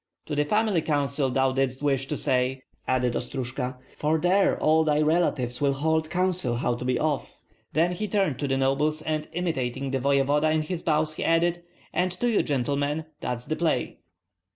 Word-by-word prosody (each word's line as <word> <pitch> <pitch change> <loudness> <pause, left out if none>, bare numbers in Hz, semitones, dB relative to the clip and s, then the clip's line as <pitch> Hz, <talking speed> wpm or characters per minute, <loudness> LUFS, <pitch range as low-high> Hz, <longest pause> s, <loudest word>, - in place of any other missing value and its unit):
"To 155 - -5
the 145 0 +2
family 210 0 +2
council 140 -2 0
thou 130 +1 +2
didst 135 +1 -1
wish 135 -2 +1
to 150 - -2
say, 125 +1 +1
Krysh," 130 - -28
added 125 -2 +1
Ostrojka; 125 0 -3 0.2
"for 155 +2 +1
there 185 +5 +2
all 160 +1 +4
thy 150 -1 +2
relatives 150 -6 +1
will 140 -1 +3
hold 160 +3 0
council 180 -8 0
how 120 0 0
to 120 - -5
be 125 0 +1
off." 150 -3 -2 0.3
Then 165 +4 +3
he 210 +4 -3
turned 195 - 0
to 145 - -1
the 135 0 +1
nobles 145 +4 +1
and 155 -1 -2
imitating 135 -6 -2
the 135 - 0
voevoda 140 +3 +2
in 155 0 +1
his 170 +2 -4
bows, 155 -1 +1
he - - -4
added, 170 +1 +2 0.3
"And 180 +1 +1
to 240 +7 -1
you, 230 -3 +3
gentlemen, 145 +2 -1
that's 125 -1 -4
the 155 - -2
play." 165 -1 -1
150 Hz, 190 wpm, -26 LUFS, 135-160 Hz, 0.3 s, all